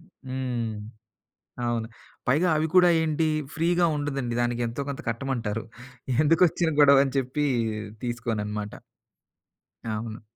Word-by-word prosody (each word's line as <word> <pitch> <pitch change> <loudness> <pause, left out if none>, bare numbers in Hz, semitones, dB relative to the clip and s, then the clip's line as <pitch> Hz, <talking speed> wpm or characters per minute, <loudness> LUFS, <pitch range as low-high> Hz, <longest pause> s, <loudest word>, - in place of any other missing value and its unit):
హ్మ్. 130 - -4 0.9
అవును. 115 -1 -1 0.4
పైగా 160 +8 +3
అవి 155 - +1
కూడా 180 -1 +7
ఏంటి 160 0 +1 0.3
ఫ్రీ‌గా 170 +2 +2
ఉండదండి. 135 -5 -2
దానికెంతో 120 +2 -1
కొంత 140 - -4
కట్టమంటారు. 115 -3 -2 0.6
ఎందుకొచ్చిన 165 +1 +3
గొడవని 140 -1 +6
చెప్పి 135 +3 -1 0.6
తీసుకోనన్నమాట. 105 -3 -3 1.2
అవును. 110 +1 -5
130 Hz, 95 wpm, -26 LUFS, 115-155 Hz, 1.2 s, కూడా